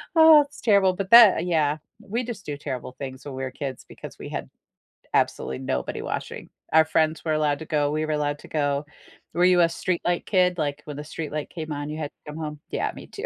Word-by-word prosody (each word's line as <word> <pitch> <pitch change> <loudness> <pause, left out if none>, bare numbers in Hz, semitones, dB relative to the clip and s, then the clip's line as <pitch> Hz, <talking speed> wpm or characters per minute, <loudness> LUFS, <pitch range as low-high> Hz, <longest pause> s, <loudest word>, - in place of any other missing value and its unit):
Oh, 320 -2 +9
that's 285 - -15
terrible, 200 -4 +4
but 190 0 -4
that 230 -6 +8
yeah, 155 -4 +1 0.2
we 230 +5 -3
just 230 -5 -7
do 145 -1 -4
terrible 130 -2 -6
things 130 -1 -7
when 140 - -7
we're 130 -1 -4
kids 135 -2 -6
because - - -11
we - - -7
had - - -5 0.6
absolutely 65 0 0
nobody 65 -1 -3
watching. - - -5 0.2
Our 160 - +7
friends 160 0 0
were 160 - -1
allowed 150 -2 +1
to 160 - -7
go, 145 -2 +1
we 155 +1 -1
were 155 - -3
allowed 145 -1 -1
to - - -13
go. 145 -1 0 0.5
Were 175 +1 +3
you 180 -1 +5
a 170 - +7
streetlight 175 +1 -1
kid? 180 -2 +2
Like, 145 -1 -2
when 150 -2 -7
the 150 - -5
streetlight 155 -1 -5
came 160 -2 -6
on, 145 0 -4
you 155 - -5
had 145 -2 -4
to 150 - -7
come 155 - -8
home? 150 -2 -5
Yeah, - - -1
me - - -10
too. 420 - -7
155 Hz, 225 wpm, -25 LUFS, 145-180 Hz, 0.6 s, Oh